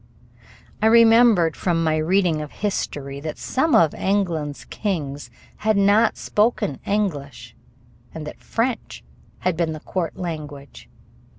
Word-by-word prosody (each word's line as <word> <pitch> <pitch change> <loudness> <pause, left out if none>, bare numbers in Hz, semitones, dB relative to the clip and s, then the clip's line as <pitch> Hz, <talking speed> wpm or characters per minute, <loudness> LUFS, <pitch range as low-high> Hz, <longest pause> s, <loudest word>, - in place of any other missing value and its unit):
I 220 - +4
remembered 225 -7 +5
from 170 -2 0
my 155 -1 +1
reading 165 0 +1
of 150 - -7
history 140 -9 -3
that 155 +1 -6
some 310 +4 +1
of 160 -3 +4
England's 170 -7 -1
kings 145 - -4 0.3
had 215 -1 +1
not 205 +3 +3
spoken 210 - 0
English 170 - -3 0.6
and 160 -1 -7
that 150 - -9
French 235 +1 -3 0.4
had 180 -2 0
been 165 -1 -1
the 155 - -7
court 170 +1 -4
language. 150 - -7
170 Hz, 125 wpm, -22 LUFS, 150-210 Hz, 0.6 s, remembered